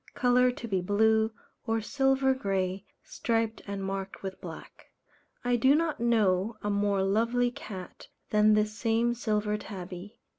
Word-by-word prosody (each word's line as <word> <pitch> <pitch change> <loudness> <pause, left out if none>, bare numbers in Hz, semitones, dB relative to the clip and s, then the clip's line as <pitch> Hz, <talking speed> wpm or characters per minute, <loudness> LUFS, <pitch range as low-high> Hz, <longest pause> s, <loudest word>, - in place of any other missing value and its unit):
_ - - -42
Colour 250 0 +4
to 245 -1 -5
be 190 -4 0
blue, 220 +3 +3 0.4
or 225 0 +1
silver 270 +3 +2
grey, 195 -5 -2 0.2
striped 225 -1 -1
and 200 -1 -4
marked 195 0 -5
with 190 -1 -6
black. 165 -3 -10 0.6
I 245 0 +3
do 260 +5 +5
not 325 0 0
know 215 -3 +2
a 205 - 0
more 200 -1 +1
lovely 230 +5 +1
cat 195 -9 -9 0.2
than 215 0 +5
this 210 0 +1
same 230 +1 +1
Silver 210 -3 -1
Tabby. 190 +2 -8
215 Hz, 150 wpm, -29 LUFS, 195-240 Hz, 0.6 s, do